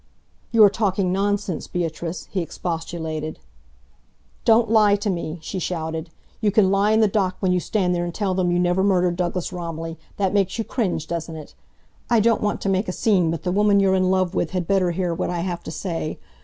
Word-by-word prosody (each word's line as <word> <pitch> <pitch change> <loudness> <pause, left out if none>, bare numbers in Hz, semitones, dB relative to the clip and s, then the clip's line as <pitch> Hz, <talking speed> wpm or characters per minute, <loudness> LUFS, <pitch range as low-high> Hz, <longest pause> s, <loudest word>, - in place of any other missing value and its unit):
"You 225 -2 +6
are 205 - +9
talking 195 -3 0
nonsense, 200 -2 -1
Beatrice," 170 0 -4
he 190 - -1
expostulated. 160 -2 -4 1.1
"Don't 230 0 +5
lie 215 -2 +5
to 205 0 -1
me!" 170 -2 -4
she 190 - -4
shouted. 160 -2 -3 0.3
"You 215 - +2
can 200 -2 +3
lie 200 +1 +3
in 220 +1 +4
the 215 - +5
dock 190 -2 0
when 190 -2 +1
you 180 - +2
stand 180 -1 0
there 175 0 0
and 175 - -3
tell 195 +1 -1
them 180 -1 +1
you 175 - +2
never 180 +1 +2
murdered 180 -3 +2
Douglas 180 0 -2
Romilly! 165 -2 -5 0.2
That 195 -2 0
makes 195 -1 +1
you 225 - -1
cringe, 195 - -2
doesn't 165 -1 -4
it? 155 -2 -10 0.6
I 235 -2 +4
don't 230 +2 +3
want 210 - -1
to - - -3
make 195 +2 +1
a - - -1
scene, 185 -4 +2
but 160 -1 -3
the 180 - -1
woman 205 +1 +4
you're 195 -1 +3
in 185 -1 +2
love 185 -1 +1
with 175 - 0
had 180 -2 -1
better 195 -2 +2
hear 175 0 -1
what 170 - -2
I 175 -1 -2
have 175 -1 -3
to - - -5
say. 165 -1 -4
185 Hz, 215 wpm, -23 LUFS, 170-200 Hz, 1.1 s, are